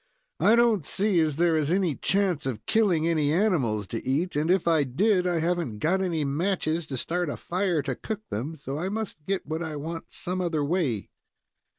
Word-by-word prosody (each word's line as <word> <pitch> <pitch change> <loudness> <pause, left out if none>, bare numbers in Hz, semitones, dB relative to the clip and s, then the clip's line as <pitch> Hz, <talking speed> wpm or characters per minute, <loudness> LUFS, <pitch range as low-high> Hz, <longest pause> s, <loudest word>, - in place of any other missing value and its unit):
"I 205 +8 +5
don't 235 -6 +3
see 195 +4 +3
as 155 -3 +2
there 170 +1 +3
is 155 -2 +1
any 185 -4 +2
chance 185 -4 0
of 115 -4 -4
killing 190 -8 +2
any 155 -3 +2
animals 150 - +1
to 115 - -4
eat, 145 +8 -1
and, 150 +3 0
if 185 -1 +2
I 160 -3 +4
did, 180 - +2
I 175 -2 +1
haven't 165 -9 -1
got 175 - +1
any 165 -5 0
matches 160 +1 -1
to 135 - -4
start 175 +5 -1
a - - -4
fire 180 -4 -1
to 135 -1 -2
cook 215 - -6
them, 145 +9 -4
so 140 0 -5
I 180 +4 -2
must 210 -7 -5
get 195 -1 -1
what 160 +2 -3
I 160 -2 -4
want 165 +3 -6
some 185 +1 -2
other 160 -5 0
way." 140 - -1
165 Hz, 205 wpm, -26 LUFS, 145-185 Hz, -, I